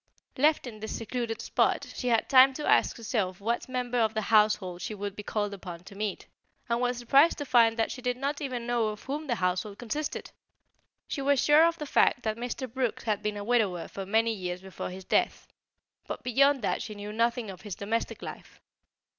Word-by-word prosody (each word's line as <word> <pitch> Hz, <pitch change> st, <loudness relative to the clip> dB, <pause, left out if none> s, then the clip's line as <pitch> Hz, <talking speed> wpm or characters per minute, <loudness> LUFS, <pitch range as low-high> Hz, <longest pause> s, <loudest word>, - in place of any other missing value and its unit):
Left 300 Hz, +3 st, +3 dB
in 225 Hz, -4 st, -8 dB
this 220 Hz, +1 st, -4 dB
secluded 230 Hz, 0 st, -4 dB
spot, -, -, +1 dB
she 250 Hz, -, -3 dB
had 230 Hz, -2 st, +2 dB
time 265 Hz, 0 st, +7 dB
to 300 Hz, -, -4 dB
ask -, -, +3 dB
herself 210 Hz, -5 st, -2 dB
what 235 Hz, +5 st, -2 dB
member 250 Hz, -1 st, -1 dB
of 220 Hz, -1 st, +1 dB
the 220 Hz, -, +1 dB
household 210 Hz, -4 st, +3 dB
she 215 Hz, -, -4 dB
would 200 Hz, -1 st, -5 dB
be 210 Hz, -, -6 dB
called 205 Hz, 0 st, -2 dB
upon 180 Hz, -3 st, -8 dB
to 195 Hz, -, -12 dB
meet, 205 Hz, 0 st, -4 dB, 0.4 s
and 235 Hz, 0 st, 0 dB
was 250 Hz, 0 st, 0 dB
surprised 275 Hz, +7 st, +4 dB
to 290 Hz, -, -4 dB
find 230 Hz, -3 st, +4 dB
that 225 Hz, -, +1 dB
she 255 Hz, -, -7 dB
did 250 Hz, 0 st, -1 dB
not 280 Hz, +3 st, -2 dB
even 255 Hz, -4 st, -3 dB
know 240 Hz, -2 st, +1 dB
of 210 Hz, -1 st, -5 dB
whom 295 Hz, +3 st, -4 dB
the 240 Hz, -, +1 dB
household 185 Hz, +1 st, -1 dB
consisted. 290 Hz, +6 st, -4 dB, 0.8 s
She 280 Hz, -, -3 dB
was 280 Hz, 0 st, +3 dB
sure 300 Hz, +5 st, +6 dB
of 335 Hz, 0 st, -1 dB
the 300 Hz, -, -5 dB
fact 245 Hz, -3 st, +3 dB
that 220 Hz, -1 st, -1 dB
Mr. 245 Hz, +3 st, -4 dB
Brooks 250 Hz, -1 st, -2 dB
had 215 Hz, -3 st, -1 dB
been 210 Hz, -1 st, -2 dB
a 205 Hz, -, -4 dB
widower 205 Hz, -7 st, +1 dB
for 195 Hz, -1 st, -7 dB
many 225 Hz, +2 st, +2 dB
years 180 Hz, -3 st, -4 dB
before 190 Hz, 0 st, -7 dB
his 185 Hz, +1 st, -9 dB
death, -, -, 0 dB, 0.6 s
but -, -, -5 dB
beyond 275 Hz, +1 st, +3 dB
that -, -, 0 dB
she 215 Hz, -, -6 dB
knew 205 Hz, +1 st, -7 dB
nothing 230 Hz, -1 st, 0 dB
of 185 Hz, -, -12 dB
his 205 Hz, -4 st, -6 dB
domestic 220 Hz, +3 st, -3 dB
life. -, -, -9 dB
230 Hz, 215 wpm, -28 LUFS, 205-255 Hz, 0.8 s, time